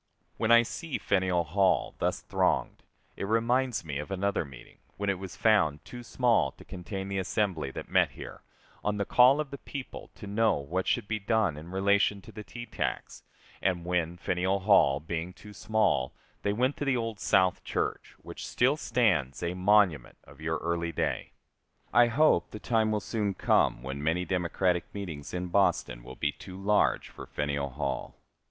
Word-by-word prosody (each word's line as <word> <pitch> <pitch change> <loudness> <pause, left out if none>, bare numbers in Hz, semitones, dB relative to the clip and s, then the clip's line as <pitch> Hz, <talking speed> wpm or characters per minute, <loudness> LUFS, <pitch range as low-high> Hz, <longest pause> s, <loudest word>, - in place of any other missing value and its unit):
When 110 - +1
I 115 0 +8
see 160 +5 -4
Faneuil 95 -3 +1
Hall 95 +4 +1
thus - - 0
thronged - - 0 0.3
it - - -4
reminds 120 0 +1
me 70 -3 -3
of 75 - -6
another 100 0 0
meeting, 70 -5 -14 0.2
when 100 0 0
it 95 - -4
was 95 -1 -7
found 95 -10 +2
too 120 - -9
small 120 -1 +2
to - - -16
contain 95 +2 -6
the 100 0 -2
assembly 95 -6 -1
that - - -7
met - - +3
here, - - -9 0.4
on 105 0 0
the 100 - -1
call 125 +7 +6
of 150 -3 -3
the 140 - -7
people, 135 -2 -8
to - - -10
know 110 +2 +2
what 85 +7 -3
should - - 0
be 110 0 -1
done 105 -5 +1
in 80 +3 -10
relation 100 +2 +2
to - - -12
the 105 - -8
tea 120 +2 -8
tax, - - -4 0.4
and 90 -3 0
when, 90 -1 -1
Faneuil 95 +3 0
Hall 95 -9 +5
being 85 +3 -4
too 105 +2 -13
small, 100 -9 0 0.3
they 100 - 0
went 125 +6 0
to 145 - -3
the 135 -2 +2
old 115 -3 -3
South 95 -1 +2
Church, - - -3
which - - -8
still 130 +5 +2
stands 105 - +1
a 85 +1 -1
monument 90 -7 +2
of 70 +2 -16
your 80 0 -1
early 85 0 -1
day. - - -2 0.6
I 120 +2 +6
hope 120 - +3
the - - -8
time 110 -2 +1
will 105 -1 0
soon 105 -4 -2
come - - +2
when 70 +2 -5
many 80 +4 0
Democratic 90 0 0
meetings 85 -8 -6
in 90 0 -3
Boston 95 -10 +1
will 65 +1 -10
be 75 - 0
too 95 +4 -11
large 105 +2 +2
for - - -10
Faneuil 70 -1 -2
Hall. 70 +1 -4
95 Hz, 185 wpm, -29 LUFS, 85-110 Hz, 0.6 s, I